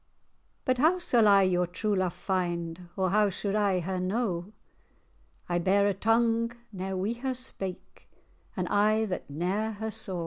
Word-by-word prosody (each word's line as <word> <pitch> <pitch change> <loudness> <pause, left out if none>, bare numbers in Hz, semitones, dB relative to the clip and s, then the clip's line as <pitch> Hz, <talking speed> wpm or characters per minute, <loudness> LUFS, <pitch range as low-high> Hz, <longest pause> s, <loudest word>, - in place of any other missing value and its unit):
"But 255 -1 +1
how 320 +6 +4
sall 240 -11 +3
I 200 -1 +6
your 180 -1 +2
true 205 +4 -1
love 185 -2 0
find, 175 -2 -3
Or 185 -2 +1
how 210 0 +4
suld 195 +1 -3
I 200 -3 +2
her 185 +2 -3
know? 185 -1 -2 1.0
I 175 0 0
bear 195 +3 +3
a 205 - +2
tongue 230 +2 +2 0.2
ne'er 190 0 -4
wi' 215 +6 -2
her 260 0 -2
spake, 195 -7 -6 0.5
An 180 - 0
eye 215 +2 +3
that 185 -7 -5
ne'er 190 +9 -1
her 220 +1 -4
saw." 190 -3 -3
195 Hz, 165 wpm, -28 LUFS, 180-220 Hz, 1.0 s, I